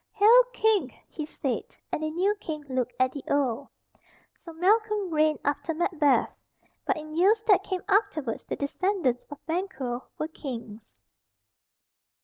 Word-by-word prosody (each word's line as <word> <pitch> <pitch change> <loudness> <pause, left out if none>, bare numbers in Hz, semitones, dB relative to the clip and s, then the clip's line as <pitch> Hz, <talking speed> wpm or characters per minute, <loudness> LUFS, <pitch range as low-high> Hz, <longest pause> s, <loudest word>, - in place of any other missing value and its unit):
"Hail, 445 +4 +7
King!" 430 - +2 0.2
he 305 -2 -6
said; 270 -5 -4
and - - -2
the 310 - -1
new 365 +6 +1
King 305 -6 -6
looked 250 -2 -2
at 255 0 +3
the 280 0 -7
old. 275 -2 0 0.7
So 335 - -12
Malcolm 410 +3 +1
reigned 310 0 +3
after 285 +3 -1
Macbeth; 315 -4 +2 0.5
but - - +2
in 310 0 -8
years 415 +6 +4
that 405 -4 +5
came 375 -2 -4
afterwards 390 - +1
the - - -4
descendants 285 -4 0
of 290 0 -11
Banquo 320 -8 -3
were 310 - -2
kings. 230 - -8
310 Hz, 140 wpm, -27 LUFS, 275-390 Hz, 0.7 s, Hail